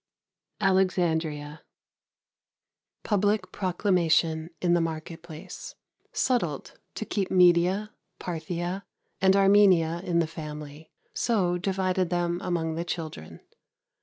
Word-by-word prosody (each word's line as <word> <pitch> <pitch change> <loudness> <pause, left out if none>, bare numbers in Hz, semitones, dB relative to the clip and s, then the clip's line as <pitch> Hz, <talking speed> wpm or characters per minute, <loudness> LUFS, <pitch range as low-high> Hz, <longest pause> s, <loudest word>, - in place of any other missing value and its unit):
Alexandria. 165 -6 +1 1.4
Public 205 -2 +1
proclamation 170 -4 +1
in 175 -1 +2
the 175 - +3
market 165 0 -4
place. 170 +2 -9 0.4
Settled 175 - -1 0.2
to 220 - -4
keep 200 -2 -2
Media, 180 +3 +4 0.3
Parthia 175 +3 -4 0.4
and 190 0 +5
Armenia 195 -4 +5
in 175 -3 0
the 170 - +3
family, 150 -1 -8 0.2
so 190 -7 +1
divided 185 -1 0
them 175 0 0
among 165 -3 -1
the 165 +1 -2
children. 165 -2 -6
175 Hz, 100 wpm, -27 LUFS, 160-190 Hz, 1.4 s, and